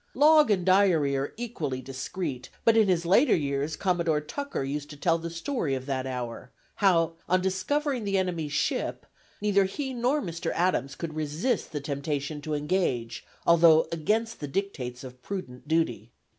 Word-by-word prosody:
Log 300 -1 +6
and 190 -4 +2
diary 185 -7 +4
are 135 +1 -2
equally 165 - -3
discreet, 130 +1 -5 0.2
but 230 - +6
in 220 -2 +5
his 175 -2 +1
later 200 - +5
years 145 0 -1
Commodore 170 -4 +1
Tucker 280 - -4
used 145 +2 -4
to 145 - -10
tell 165 +3 +2
the 170 +1 -5
story 165 - -2
of 130 0 -5
that 130 -1 -2
hour; 125 -1 -5 0.3
how 170 -5 +3 0.2
on 185 +1 +4
discovering 245 +8 -1
the 200 -1 0
enemy's 170 -5 -1
ship, 145 - -1 0.4
"neither 200 -2 +3
he 265 +7 -4
nor 250 +5 +1
Mr. 170 - -3
Adams 140 -7 0
could 165 0 -5
resist 155 - -1
the 150 - -3
temptation 145 +1 -3
to 155 0 -3
engage, 145 -8 -1 0.2
although 165 -1 +6
against 220 +8 -1
the 145 - -4
dictates 135 -8 -4
of 125 -1 -11
prudent 135 -10 -7
duty. 135 -10 0
165 Hz, 165 wpm, -27 LUFS, 140-195 Hz, 0.4 s, Log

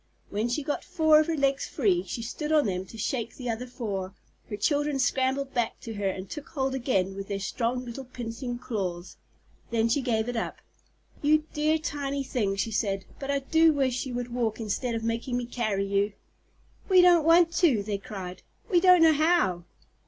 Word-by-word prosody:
When 215 +4 -1
she 260 +5 -1
got 290 +1 -2
four 315 -4 +4
of 310 - +1
her 330 -1 -1
legs 275 0 +1
free, 375 -4 +1
and - - -8 0.2
stood 300 +6 -4
on 305 -3 +4
them 185 -2 -2
to 225 - -11
shake 230 +2 -2
the 250 -2 -3
other 235 +3 -5
four, 195 -6 -4 0.3
her 205 - -4
children 290 +2 +1
scrambled 265 +1 0
back 240 -3 -1
to 225 - -6
her 200 -2 -1
and 190 0 -5
took 295 +6 -8
hold 270 -3 -1
again 195 -8 0
with 195 0 -6
their 200 -1 -3
strong 245 +5 -2
little 245 +3 -7
pinching 245 0 -5
claws. 190 -7 -4 0.5
Then 230 -1 +1
she 275 +5 +2
gave 230 -3 0
it 245 - -3
up. 225 - -3 0.6
"You 305 +1 +4
dear 305 +1 +2
tiny 280 -2 -3
things!" 205 -7 -1
she 225 - -3
said. 195 -3 -1
"But 275 -1 -6
I 280 - +2
do 320 +3 +4
wish 265 -2 0
you 250 - -5
would 245 -1 -4
walk 230 -3 -1
instead 230 +2 -2
of 225 - -3
making 230 +2 -1
me 245 - -2
carry 215 -5 -1
you." 200 +1 0 0.8
"We 370 -2 +7
don't 350 -3 +6
want 335 +1 +5
to!" 270 - +3
they 200 -1 -3
cried; 185 -3 -7 0.3
"we 355 - +5
don't 365 -2 +7
know 320 -1 +7
how." 305 - +2
245 Hz, 200 wpm, -27 LUFS, 215-290 Hz, 0.8 s, We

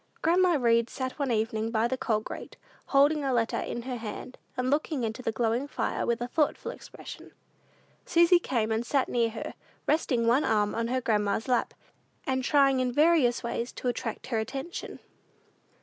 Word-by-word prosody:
Grandma 350 +1 +4
Read 235 -1 +3
sat 260 +2 -5
one 275 -3 0
evening 220 0 0
by 225 0 +1
the 260 - -1
coal 220 -4 0
grate, - - -8 0.3
holding 290 +2 +4
a 270 - 0
letter 235 -2 +1
in 235 - -4
her 250 0 -4
hand, 230 +3 -7 0.2
and 255 +1 0
looking 295 -2 0
into 225 +2 -3
the 225 - -1
glowing 235 +4 0
fire - - -2
with 235 0 +1
a 240 - -1
thoughtful 300 +3 0
expression. - - -11 0.7
Susy 340 +1 +5
came 230 -9 -1
and 220 +1 0
sat 265 +2 +1
near 235 -1 +1
her, 225 0 -6 0.3
resting 255 -7 +1
one 245 +6 +4
arm 210 -1 +2
on 230 0 -1
her 255 +2 0
grandma's 210 -1 0
lap, 250 -2 +1 0.5
and 260 -1 0
trying 275 -1 +4
in 255 -1 +1
various 295 -3 +3
ways 235 +1 -3
to - - -5
attract 235 -2 -3
her 230 -4 -1
attention. 270 +9 -5
245 Hz, 180 wpm, -28 LUFS, 230-275 Hz, 0.7 s, Susy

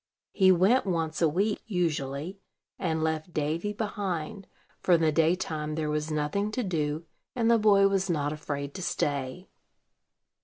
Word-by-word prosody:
He 190 -2 +5
went 195 +7 +4
once 165 -3 -1
a 165 - +5
week, 200 +7 0
usually, 165 -2 -2 0.4
and 160 -3 -1
left 160 +1 -2
Davy 160 +7 -1
behind; 200 -4 -4 0.3
for 180 - +2
in 165 - +1
the 160 -1 +3
daytime 155 -1 0
there 155 -1 -1
was 150 +1 -2
nothing 155 +7 -1
to 250 - -1
do, 155 -4 -2 0.3
and 235 -2 +2
the 230 - +5
boy 200 -2 +5
was 195 -1 0
not 145 -3 0
afraid 145 -2 -5
to 190 - -6
stay. 145 0 -2
165 Hz, 155 wpm, -28 LUFS, 150-195 Hz, 0.4 s, He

